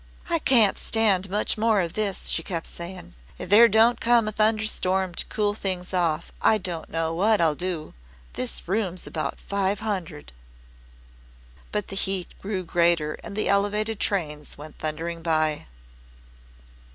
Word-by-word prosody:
"I 335 - +2
can't 235 -9 +4
stand 200 -4 +2
much 210 +2 0
more 220 -2 +3
of 170 -3 -2
this," 205 -3 -1
she - - 0
kept 165 -1 -4
saying. 175 0 -8 0.2
"If - - -7
there 230 +3 +9
don't 225 +3 +4
come 235 -2 +4
a - - 0
thunderstorm 215 -4 0
to - - -2
cool 205 -1 0
things 185 -3 -4
off 170 -3 0
I 220 - +4
don't 175 -5 -5
know 165 0 -1
what 205 +5 +3
I'll 160 -2 +3
do. 175 -1 -4 0.4
This 125 - -4
room's 185 -2 -1
about 155 - -4
five 200 0 -1
hundred." 180 - -4 1.4
But 210 -2 -2
the 195 - -5
heat 190 -2 -2
grew 195 -2 -3
greater 170 -3 +2
and 200 - -8
the 215 - 0
Elevated 210 +2 +1
trains 150 -7 -2
went 150 +1 -11
thundering 165 +2 -4
by. 155 -2 0
190 Hz, 150 wpm, -25 LUFS, 170-210 Hz, 1.4 s, there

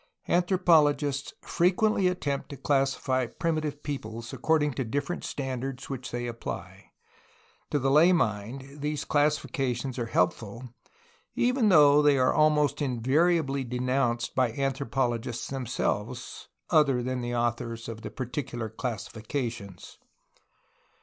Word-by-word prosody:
Anthropologists 155 -6 +3
frequently 185 +3 +2
attempt 145 -6 -2
to 140 - -7
classify 135 -2 +1
primitive 155 +2 -2
peoples 115 -4 -5
according 150 +2 +1
to 135 - -2
different 140 +8 -3
standards 135 0 -4
which 130 -2 -5
they 120 0 -3
apply. 115 -1 -6 0.8
To - - +1
the 135 -1 +1
lay 160 +6 +6
mind 135 - -2
these 150 0 -2
classifications 135 -4 0
are 120 - -2
helpful, 105 +6 -1 0.7
even 250 -3 +2
though 150 -4 +7
they 145 -2 +4
are 130 -1 +3
almost 150 -1 +3
invariably 140 +3 +1
denounced 125 -1 -1
by 125 -3 +1
anthropologists 130 -3 -2
themselves 135 -4 -3
— - - -52
other 135 -5 +4
than 130 0 -2
the 120 0 -3
authors 115 -1 -2
of 115 -1 -7
the - - -6
particular 120 -3 -4
classi 115 -2 -4
fications. 115 -5 -5
135 Hz, 120 wpm, -28 LUFS, 120-150 Hz, 0.8 s, though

